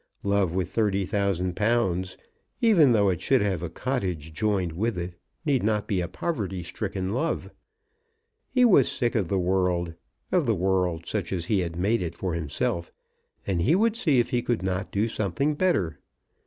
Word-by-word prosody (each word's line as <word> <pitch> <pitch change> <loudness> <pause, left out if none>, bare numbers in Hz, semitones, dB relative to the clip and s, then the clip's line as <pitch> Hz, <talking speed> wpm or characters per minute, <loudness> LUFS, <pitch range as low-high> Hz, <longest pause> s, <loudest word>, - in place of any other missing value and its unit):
Love 100 -3 +1
with 95 -1 -1
thirty 100 -3 +1
thousand 95 -2 -1
pounds, 95 -5 0 0.4
even 200 - +5
though 100 -4 +4
it 90 -3 -1
should 135 - +3
have 95 -5 -1
a 85 - -3
cottage 90 - -3
joined 95 -2 0
with 105 +6 -1
it, 85 0 -4 0.3
need 140 -4 +2
not 105 0 0
be 100 -5 0
a 85 - -2
poverty 100 - -3
stricken 95 +2 -4
love. 130 +11 -2 1.0
He 250 -1 +4
was 180 - +5
sick 120 -1 0
of 100 -6 0
the 95 - 0
world, 90 -2 +1 0.4
of - - +2
the - - +3
world 90 -2 0
such 100 -6 -2
as 90 -3 -2
he 100 +2 +1
had 85 -2 -3
made 100 +5 +1
it 85 -2 -4
for 90 -3 -3
himself, 85 +2 -2 0.5
and 90 -3 0
he 140 - +4
would 220 +3 +2
see 165 - +2
if 120 - +2
he 120 - +1
could 120 -5 -1
not 95 +1 -2
do 105 +3 +1
something 110 - -1
better. 145 - 0
95 Hz, 180 wpm, -26 LUFS, 90-120 Hz, 1.0 s, even